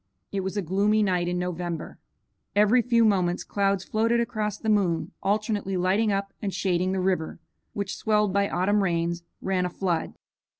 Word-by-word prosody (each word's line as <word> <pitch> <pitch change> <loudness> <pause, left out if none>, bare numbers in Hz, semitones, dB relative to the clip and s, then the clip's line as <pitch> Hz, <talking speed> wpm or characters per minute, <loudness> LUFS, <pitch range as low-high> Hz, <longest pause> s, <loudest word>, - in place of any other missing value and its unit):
It 200 - -1
was 190 +2 -3
a 200 - 0
gloomy 205 +5 +2
night 180 -3 +1
in 180 0 -1
November. 175 -2 -4 0.6
Every 210 +4 +5
few 235 -1 +3
moments 180 -4 +1
clouds 195 -2 0
floated 230 +3 +1
across 215 -3 -2
the 220 - -7
moon, 195 -6 +1
alternately 205 -1 0
lighting 195 +4 +2
up 195 0 -2
and 200 - -2
shading 185 -1 0
the 190 - -1
river, 180 -4 -1 0.3
which, 200 -2 -3
swelled 210 -3 +1
by 200 0 +2
autumn 205 +3 +2
rains, 170 -2 0 0.2
ran 190 -1 +1
a 180 - -1
flood. 175 -3 -2
195 Hz, 170 wpm, -26 LUFS, 180-210 Hz, 0.6 s, Every